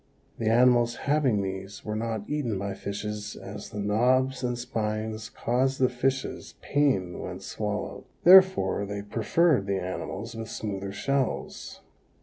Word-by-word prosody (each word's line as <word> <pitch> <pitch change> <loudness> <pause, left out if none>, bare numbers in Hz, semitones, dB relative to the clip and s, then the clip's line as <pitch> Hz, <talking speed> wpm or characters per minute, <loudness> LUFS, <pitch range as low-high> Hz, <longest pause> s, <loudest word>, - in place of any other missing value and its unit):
The 110 -1 +1
animals 120 0 +4
having 140 -8 +2
these 95 +1 -6
were 105 - -2
not 110 -2 -3
eaten 135 -9 -1
by 100 0 -3
fishes 105 +2 -5
as 100 +1 -8
the - - -8
knobs 125 +6 +2
and 125 -1 -1
spines 110 -2 -3
caused 130 +3 0
the 130 -1 +3
fishes 130 +2 -2
pain 130 -12 +1
when - - -6
swallowed, - - -4 0.2
therefore 185 - +6
they 100 0 -4
preferred 115 - +2
the 100 -1 0
animals 95 +4 -5
with 115 0 -6
smoother 100 -2 -4
shells. 135 +5 -2
115 Hz, 135 wpm, -27 LUFS, 100-130 Hz, 0.2 s, therefore